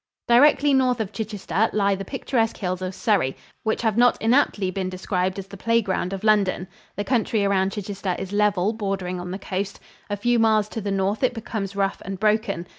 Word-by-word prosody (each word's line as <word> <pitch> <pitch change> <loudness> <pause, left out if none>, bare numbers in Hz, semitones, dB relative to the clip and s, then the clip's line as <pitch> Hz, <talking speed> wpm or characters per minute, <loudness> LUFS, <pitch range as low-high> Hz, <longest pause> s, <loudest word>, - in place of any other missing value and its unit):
Directly 285 +3 +5
north 255 -2 +2
of 215 -3 -2
Chichester 210 0 -1
lie 200 -1 +2
the 195 0 -4
picturesque 235 -2 -1
hills 185 -2 -3
of 185 0 -4
Surrey, 195 - +1 0.2
which 220 +1 -1
have 220 -2 +1
not 245 +1 +4
inaptly 225 -5 +2
been 185 0 -3
described 185 0 -2
as 195 - -5
the 200 +1 -11
play 230 +4 +2
ground 190 -4 -2
of 195 0 -5
London. 200 -4 +2 0.3
The 205 - -2
country 220 -3 +1
around 195 -1 +1
Chichester 195 -2 -3
is 195 - -6
level 205 -1 +2
bordering 195 -4 -3
on 180 0 -6
the 185 - -4
coast. 195 0 -4 0.3
A 205 - -2
few 240 +3 +2
miles 215 -2 +3
to 225 - -5
the 205 - -3
north 195 +2 0
it 255 -1 +1
becomes 215 -3 -4
rough 195 0 -1
and 195 -1 -6
broken. 215 -4 +1
205 Hz, 200 wpm, -23 LUFS, 190-225 Hz, 0.3 s, Directly